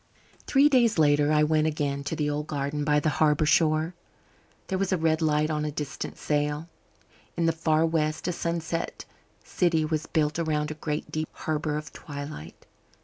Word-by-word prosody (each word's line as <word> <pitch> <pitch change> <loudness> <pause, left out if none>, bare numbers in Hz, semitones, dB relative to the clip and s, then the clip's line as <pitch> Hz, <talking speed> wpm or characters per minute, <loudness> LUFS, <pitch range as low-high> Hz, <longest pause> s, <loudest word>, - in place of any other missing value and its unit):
Three 275 +1 +5
days 240 -7 +3
later 145 -1 +4
I 150 0 +4
went 155 0 +2
again 145 -2 -2
to 150 - -2
the 150 -1 -1
old 150 +1 -2
garden 145 0 -2
by 150 0 +3
the 150 - +1
harbour 150 0 +4
shore. 155 +2 +2 0.7
There 190 -1 -2
was 195 0 0
a 185 - +2
red 160 0 +1
light 155 0 +2
on 150 -1 -1
a 150 - -1
distant 150 -1 -5
sail. 150 +1 -1 0.7
In 170 - +1
the 165 - +4
far 160 0 +2
west 155 -1 -1
a - - +1
sunset 170 -1 -3 0.4
city 165 -3 +1
was 155 0 -2
built 155 0 0
around 150 -2 0
a 155 - -9
great 150 0 -3
deep 155 0 -2
harbour 155 -1 -2
of 150 -1 -7
twilight. 145 - -8
155 Hz, 180 wpm, -27 LUFS, 150-160 Hz, 0.7 s, Three